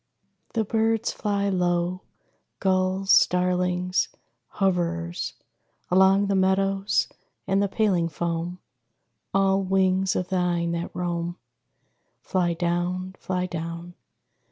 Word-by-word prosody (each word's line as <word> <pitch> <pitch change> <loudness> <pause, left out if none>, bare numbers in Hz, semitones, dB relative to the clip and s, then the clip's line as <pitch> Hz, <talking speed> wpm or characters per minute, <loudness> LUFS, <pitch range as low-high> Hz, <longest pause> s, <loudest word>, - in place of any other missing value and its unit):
The 225 - +1
birds 225 +1 +1
fly 200 -1 -1
low. 180 -1 0 0.6
Gulls, 190 0 +1
starlings, 180 0 +3 0.5
hoverers, 175 -2 -1 0.6
Along 190 +2 +5
the 200 - 0
meadows 195 +1 +2 0.4
and 195 +1 +2
the 200 - +2
paling 190 -6 +1
foam, 170 +2 -3 0.7
All 195 0 +3
wings 190 0 +2
of 180 - -2
thine 175 -2 0
that 170 0 -3
roam 175 0 -2 0.8
Fly 175 -3 0
down, 175 +2 -1
fly 180 -1 -2
down. 170 0 -6
185 Hz, 100 wpm, -25 LUFS, 175-195 Hz, 0.8 s, Along